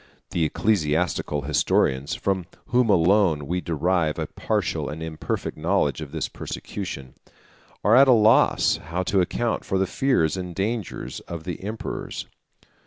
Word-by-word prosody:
The 85 - +1
ecclesiastical 80 -4 0
historians, 70 -1 +1
from 95 -3 -1 0.2
whom 125 -1 +3
alone 90 -4 +3
we 90 +5 -2
derive 85 -1 0
a - - -1
partial - - -2
and 80 +2 -6
imperfect 80 -1 -4
knowledge 80 -4 0
of 75 -3 -7
this 80 0 -2
persecution, 70 -10 -6 0.7
are 105 +4 +5
at 135 +2 +7
a - - +7
loss 110 -1 +4
how 85 +4 -4
to 95 +1 +2
account 115 +6 -1
for 95 - -1
the 95 - +2
fears 95 - +1
and 90 -2 -5
dangers 105 +1 -3
of 85 -2 -6
the 90 -1 -5
emperors. 105 +3 -5
90 Hz, 145 wpm, -24 LUFS, 80-100 Hz, 0.7 s, at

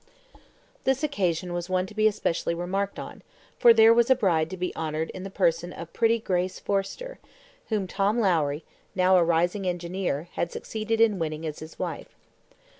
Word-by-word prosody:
This 265 +2 +1
occasion 180 - -1
was 175 +1 -4
one 185 0 +1
to 210 - -11
be 215 0 +3
especially 170 -5 -1
remarked 195 +3 -2
on, - - -8 0.4
for 235 - +8
there 225 0 +7
was 235 +1 +3
a 260 - +7
bride 170 -9 +1
to 185 - -6
be 180 0 -3
honoured 160 0 -3
in 185 - -8
the 195 - -6
person 175 -3 0
of 170 -1 -9
pretty 230 0 +3
Grace 185 -4 -2
Forrester, 205 - -3 0.5
whom 210 -4 0
Tom 200 +4 0
Lowrie, 160 -7 +1 0.3
now 185 0 +4
a 180 - +5
rising 175 +4 +1
engineer, 175 -2 -2
had 170 - -2
succeeded 220 +1 -3
in 220 -4 +4
winning 155 0 -3
as 150 -1 -5
his 155 +1 -10
wife. - - -5
185 Hz, 180 wpm, -26 LUFS, 170-215 Hz, 0.5 s, for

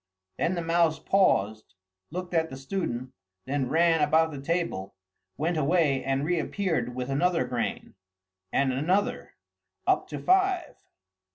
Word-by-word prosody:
Then 170 +3 +1
the 170 - -2
mouse 165 -1 +2
paused, 110 - +1 0.3
looked 180 +2 -6
at 160 -1 +1
the 130 - -8
student, 130 -4 -4 0.3
then 135 -1 -1
ran 165 0 +3
about 160 +2 +3
the 140 -2 -7
table, 165 - -2 0.4
went 165 +3 0
away 150 -3 +2
and 135 +1 0
reappeared 165 -6 -1
with 125 +1 -3
another 165 +1 +2
grain, 125 -2 -3 0.6
and 135 -1 +2
another, 180 +10 0 0.5
up - - +2
to - - -6
five. 375 -3 +2
160 Hz, 130 wpm, -27 LUFS, 135-175 Hz, 0.6 s, ran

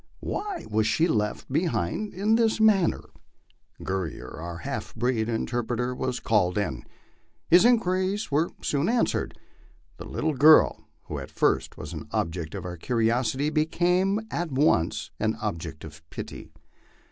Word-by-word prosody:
Why 400 -3 -4
was 110 0 +1
she 165 +8 +2
left 105 +2 -1
behind 165 - -1
in 205 +4 +1
this 225 -1 +3
manner? 210 -5 +3 0.8
Guerrier, 95 -4 -4
our 85 +1 -6
half 85 - -5
breed 115 -1 0
interpret 120 +1 -2
er, 125 +1 -1
was 125 0 -2
called 95 -5 +1
in. 85 -12 -2 0.7
His 180 +5 +7
inquiries 195 -5 +2
were 155 +4 +2
soon 145 +6 +1
answered. 240 0 0 0.6
The - - -8
little 160 - -1
girl, 150 +3 +5 0.2
who - - -5
at - - -8
first - - 0
was 75 +1 -7
an 80 - -7
object 80 -1 -2
of - - -6
our 90 -1 -5
curiosity, 120 - 0
became 180 +6 +1
at 170 -2 -2
once 110 - +1
an 110 0 0
object 85 -7 -5
of 80 -1 -10
pity. - - -8
125 Hz, 145 wpm, -26 LUFS, -, 0.8 s, His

